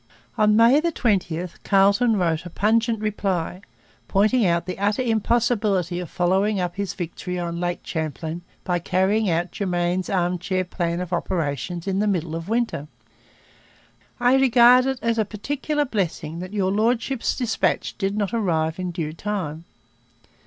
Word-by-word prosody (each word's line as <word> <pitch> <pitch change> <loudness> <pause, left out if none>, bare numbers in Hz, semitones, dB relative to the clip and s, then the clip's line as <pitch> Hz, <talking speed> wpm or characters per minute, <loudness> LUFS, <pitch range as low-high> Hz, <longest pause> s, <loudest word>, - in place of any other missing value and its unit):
On 210 0 +4
May 235 +6 +6
20 200 - 0 0.2
Carleton 200 +4 +4
wrote 165 -3 0
a 175 - -8
pungent 225 +5 +1
reply, 195 -4 -2 0.5
pointing 210 +2 +3
out 170 0 +1
the 185 +1 -5
utter 205 +5 +1
impossibility 220 -6 +1
of 175 -3 -6
following 190 +3 +1
up 180 -1 -2
his 200 -1 -3
victory 180 +1 -5
on 170 -1 -3
Lake 175 0 -2
Champlain 160 +1 -4 0.2
by 175 -1 0
carrying 190 +4 +1
out 170 +1 0
Germain's 180 -1 -1
arm 180 -1 0
chair 185 0 -1
plan 175 -1 -2
of 180 0 -5
operations 170 -1 -2
in 195 -1 -1
the 210 - +1
middle 170 -5 -1
of 165 +3 -6
winter. 225 -10 -1 1.3
'I 245 +2 +4
regard 250 0 +6
it 265 -1 -1
as 230 -1 +1
a - - +4
particular 285 +8 -2
blessing 170 - -3
that 185 +1 -6
your 195 -3 0
Lordship's 230 +4 0
dispatch 240 -4 -1
did 195 0 -1
not 205 +1 -1
arrive 165 -7 0
in 180 -1 -2
due 165 -3 -4
time.' 170 -4 -4
190 Hz, 150 wpm, -23 LUFS, 175-220 Hz, 1.3 s, May